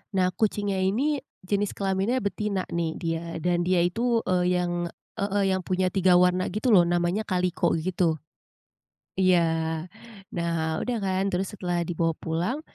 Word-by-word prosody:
nah 185 -1 +3
kucingnya 205 -1 0
ini 265 +10 +1 0.2
jenis 200 +2 -1
kelaminnya 200 +5 0
betina 200 -1 -1
nih 165 -1 -1
dia, 165 -1 -2 0.2
dan 175 0 +1
dia 180 -2 +3
itu, 230 +6 +1
eee, 180 0 +1
yang 175 -1 -1 0.3
heeh 200 0 +1
yang 190 - +1
punya 185 0 0
3 185 -2 +4
warna 180 +1 +3
gitu 215 +6 0
loh, 175 -4 +6
namanya 175 +4 0
kaliko 180 -1 +1
gitu. 170 0 0 1.0
Iya. 185 -2 +4 1.0
Nah, 165 -2 -1
udah 245 -1 -1
kan, 190 -1 0
terus 185 +2 -1
setelah 175 -2 -1
dibawa 165 -1 0
pulang 175 - -1
185 Hz, 145 wpm, -26 LUFS, 175-200 Hz, 1.0 s, loh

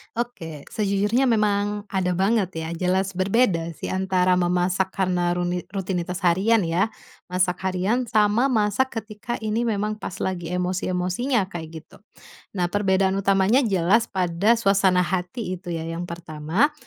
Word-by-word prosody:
Oke, 165 -11 -5
sejujurnya 210 +5 +1
memang 205 -2 +1
ada 180 -2 0
banget 195 +1 +2
ya. 160 0 -4
Jelas 185 +3 0
berbeda 185 -3 +1
sih - - -5
antara 185 -1 +2
memasak 180 +2 +1
karena 180 -2 +1
runi 175 0 -2
rutinitas 185 -1 -3
harian 195 +5 +3
ya, 170 +5 +1 0.4
masak 180 0 0
harian 200 +7 0
sama 215 +4 +3
masak 225 0 +1
ketika 215 +2 -6
ini 220 +2 0
memang 210 0 -1
pas 185 - -6
lagi 180 -3 -3
emosi-emosinya 185 +6 0
kayak 165 -2 -6 0.2
gitu. - - -19 0.6
Nah 180 -2 +1
perbedaan 190 0 +1
utamanya 195 +5 +3
jelas 205 +1 +2
pada 190 +5 +2
suasana 195 -4 +3
hati 185 +3 -3
itu 180 -1 -8
ya 165 -1 -3
yang 165 +1 -4
pertama, 170 - -1
190 Hz, 140 wpm, -23 LUFS, 180-210 Hz, 0.6 s, harian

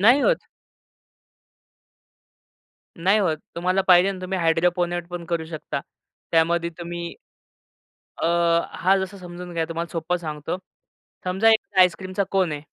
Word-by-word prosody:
नाही 245 +8 +6
होत. - - +2 2.6
नाही 195 +3 +5
होत. 170 -6 +1 0.2
तुम्हाला 185 +3 +1
पाहिजे 185 +2 +6
ना 185 - -8
तुम्ही 185 +1 -2
हायड्रोपोनेट 175 +1 +1
पण 175 -1 -6
करू 170 -2 -1
शकता. 160 -2 -5 0.5
त्यामध्ये 170 +1 +2
तुम्ही 170 0 -5 1.1
अ, - - +3 0.5
हा 190 +2 +3
जसा 190 +1 -4
समजून 175 0 -8
घ्या 165 -1 +1
तुम्हाला 165 +1 -3
सोप्पं 165 +1 -1
सांगतो. 155 0 -4 0.7
समजा 190 +5 +3
एक 215 -3 +1
आईसक्रीमचा 185 +2 +2
कोन 185 -5 +2
आहे. 145 0 -5
175 Hz, 125 wpm, -24 LUFS, 170-190 Hz, 2.6 s, नाही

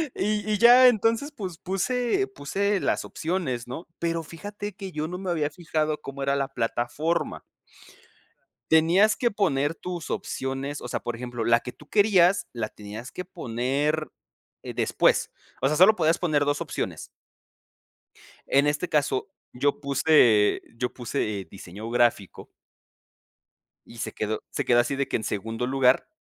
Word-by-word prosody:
Y 210 +1 -1
y 210 - +1
ya. 245 +3 +8
Entonces, 230 +4 +1
pues, 190 - -6
puse 215 - 0
puse 195 +9 -1
las - - 0
opciones, 160 -9 -3
¿no? 145 +8 -7
Pero 165 -1 -1
fíjate 205 +5 -7
que 195 -1 -8
yo 155 0 -3
no 180 +1 -5
me 190 -1 -4
había 155 -4 0
fijado 155 -2 -2
cómo 140 -1 -7
era 140 0 +1
la 135 -1 -1
plataforma. 135 +6 -2 1.3
Tenías 175 +7 +5
que 240 - +1
poner 165 -8 0
tus 175 -2 -6
opciones. 135 +2 -3
O - - -6
sea, - - -2
por 120 - -4
ejemplo, 120 -1 -5
la 115 +1 +4
que 125 - -7
tú 150 - -18
querías 200 -3 +4
la 120 - -3
tenías 105 +4 -9
que 180 - -6
poner, 145 +1 -2 0.5
eh, - - -7
después. - - +2 0.3
O 135 - +4
sea, 150 - 0
solo 190 +6 +7
podías 160 -1 +2
poner 150 -5 +1
2 145 0 0
opciones. - - -4 1.4
En 140 +1 +3
este 150 +4 0
caso, 140 +2 0 0.2
yo 140 +3 0
puse 140 -7 +4 0.2
yo 125 +1 -2
puse, 115 -4 -3
eh, 95 - -10
diseño 100 +3 -9
gráfico 120 -5 0 1.4
y 120 - -14
se - - -4
quedó 110 0 -3
se - - -2
quedó 120 -1 +4
así 125 +3 -1
de 140 0 -1
que - - 0
en 110 - -4
segundo 115 +4 -3
lugar 130 0 +3
150 Hz, 160 wpm, -26 LUFS, 125-180 Hz, 1.4 s, ya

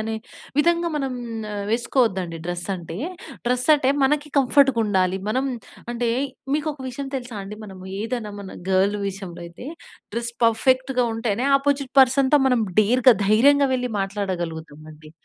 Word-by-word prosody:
అనే 220 +1 -3 0.4
విధంగా 340 +2 +3
మనం 270 -3 -2 0.6
వేసుకోవద్దండి 220 -8 0
డ్రెస్ 175 0 -4
అంటే. 165 -1 -8 0.5
డ్రెస్ 250 +1 +1
అంటే, 270 -2 +2
మనకి 295 +2 +1
కంఫర్ట్‌గుండాలి. 225 -9 +3
మనం 260 +5 0 0.5
అంటే 240 0 -1 0.5
మీకొక 300 -2 -2
విషయం 270 +2 -5
తెలుసా 245 -4 -7
అండి! 210 +2 -8
మనము 190 -2 -11 0.2
ఏదన్నా 225 -2 -3
మన 195 - -9
గర్ల్ 195 +2 +3
విషయంలో 190 -3 -8
అయితే, 170 +9 -11 0.5
డ్రెస్ 235 0 -3
పర్ఫెక్ట్‌గా 255 +2 +2
ఉంటేనే 225 +2 -1
ఆపోజిట్ 275 -1 -1
పర్సన్‌తో 265 +2 +4
మనం 250 -2 +2 0.2
డేర్‌గా 245 +3 +5
ధైర్యంగా 275 +6 +5
వెళ్ళి 250 -1 -2
మాట్లాడగలుగుతాం 175 -6 -4
అండి. 155 0 -15
235 Hz, 130 wpm, -23 LUFS, 195-265 Hz, 0.6 s, డేర్‌గా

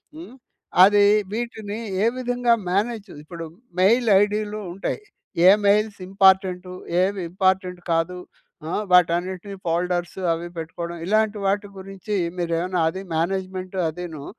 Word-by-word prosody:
హ్మ్. 320 -5 -11 0.5
అది 205 +1 +6 0.3
వీటిని 220 -2 -4 0.2
ఏ - - +4
విధంగా 245 -1 +1 0.2
మేనేజ్ 210 +1 -1
ఇప్పుడు 165 +1 -8 0.3
మెయిల్ 230 +6 +4
ఐడీలు 210 +1 -1
ఉంటాయి. 195 - -3 0.5
ఏ - - +10 0.2
మెయిల్స్ 210 0 +2
ఇంపార్టెంటు? 190 -2 +3 0.3
ఏవి 195 +1 0
ఇంపార్టెంట్ 185 -1 0
కాదు? 165 +2 0 0.5
ఆ! - - -4 0.2
వాటన్నిటిని 180 +3 +2
ఫోల్డర్సు 175 +2 -1
అవి 170 +1 -5
పెట్టుకోవడం. 170 +1 -5
ఇలాంటి 215 +1 +2
వాటి 205 +1 0
గురించి 195 +2 -6 0.2
మీరేమైనా 175 +1 -1
అది 190 +4 -6
మేనేజ్‌మెం‌ట్ 185 +2 -2
అదిను, 160 -3 -7
190 Hz, 115 wpm, -23 LUFS, 180-210 Hz, 0.5 s, ఏ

